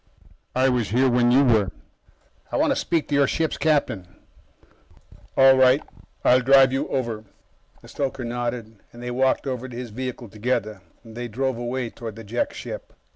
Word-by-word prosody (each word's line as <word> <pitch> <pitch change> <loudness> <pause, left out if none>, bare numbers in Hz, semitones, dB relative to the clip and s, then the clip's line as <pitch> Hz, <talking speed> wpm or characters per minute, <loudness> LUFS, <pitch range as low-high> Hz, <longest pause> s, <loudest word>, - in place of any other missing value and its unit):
"I 130 +1 +3
was 125 -4 +1
here 125 +5 +3
when 120 -1 +3
you 130 +3 +5
were." 110 -6 +3 0.8
"I - - -1
want - - +2
to - - +2
speak 165 -3 -1
to - - -3
your 140 -1 +4
ship's 160 +3 -1
captain." 140 - +1 1.3
"All 135 0 +7
right. 130 +2 +5 0.4
I'll 125 - +6
drive 135 0 +6
you 135 - -1
over." 115 -4 -3 0.6
The - - -13
stoker 135 -2 -3
nodded, 120 -2 -4
and 120 +1 -11
they 125 - -4
walked 130 +3 +1
over 130 -1 -4
to 120 - -8
his 120 -2 -6
vehicle 125 0 -6
together. 105 -2 -2 0.2
They 120 +2 -6
drove 130 +3 -1
away, 120 0 -3
toward 115 -3 -8
the 115 - -9
Jek 115 +4 -2
ship. - - -8
125 Hz, 175 wpm, -24 LUFS, 115-130 Hz, 1.3 s, All